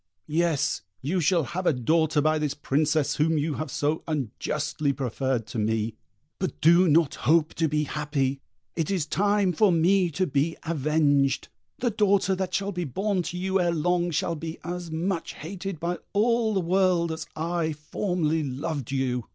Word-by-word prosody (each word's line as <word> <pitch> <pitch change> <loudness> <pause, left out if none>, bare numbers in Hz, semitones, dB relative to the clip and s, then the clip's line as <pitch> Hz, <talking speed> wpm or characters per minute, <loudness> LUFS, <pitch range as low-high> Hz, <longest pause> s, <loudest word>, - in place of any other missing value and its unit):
Yes, 160 -2 0 0.2
you 175 +7 0
shall 170 +1 +3
have 180 +6 -3
a - - +4
daughter 155 +4 +2
by 155 +1 +2
this 150 -2 -1
Princess 150 +1 +1
whom 160 +2 +2
you 150 +1 0
have 155 - -4
so 150 +2 -1
unjustly 150 +1 -2
preferred 130 -2 -2
to 115 - -5
me, 110 +1 0 0.5
but 185 - -3
do 170 +3 +6
not 160 -1 +4
hope 155 0 +2
to 160 - +1
be 150 0 0
happy: 140 -2 -2 0.3
it 165 -3 -1
is 185 -6 0
time 200 +2 +1
for 200 +4 +4
me 175 +2 +3
to 180 +4 0
be 145 +2 0
avenged. 145 -3 +1 0.3
The 245 -1 0
daughter 200 -2 +2
that 185 -1 -2
shall 200 0 -1
be 180 -2 -3
born 190 - -1
to 175 +1 -5
you 190 +1 0
ere 175 - +2
long 175 +2 +1
shall 170 +1 0
be 160 +1 -6
as 175 -1 -5
much 170 +2 -2
hated 185 +1 -6
by 175 +2 -2
all 220 +1 +2
the 190 - +2
world 180 -1 +2
as 160 0 -5
I 165 0 -1
formerly 160 +1 -1
loved 140 -1 -4
you!" 125 -3 -1
160 Hz, 175 wpm, -26 LUFS, 150-180 Hz, 0.5 s, do